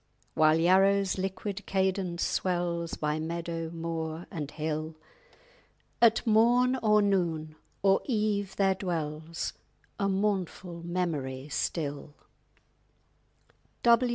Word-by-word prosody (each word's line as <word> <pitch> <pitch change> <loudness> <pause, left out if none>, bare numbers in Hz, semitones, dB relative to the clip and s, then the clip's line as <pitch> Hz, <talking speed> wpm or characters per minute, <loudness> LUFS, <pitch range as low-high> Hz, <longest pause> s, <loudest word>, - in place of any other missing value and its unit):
_ - - -42 0.3
While 155 0 +4
Yarrow's 190 +3 +3
liquid 195 +1 -4
cadence 190 -2 0
swells 175 -2 -1
By 150 0 -1
meadow, 165 0 -3
moor, 165 0 -4
and 150 -4 -4
hill, 155 +1 -3 1.1
At 230 -2 +5
morn 240 +3 +4
or 210 -1 +4
noon 165 -6 0 0.3
or 195 0 +4
eve 210 -5 0
there 195 -1 +3
dwells 165 -4 -3 0.5
_A 200 -1 +1
mournful 190 -3 -2
memory 155 -6 -3
still. 145 -1 -3
175 Hz, 100 wpm, -29 LUFS, 160-195 Hz, 1.1 s, At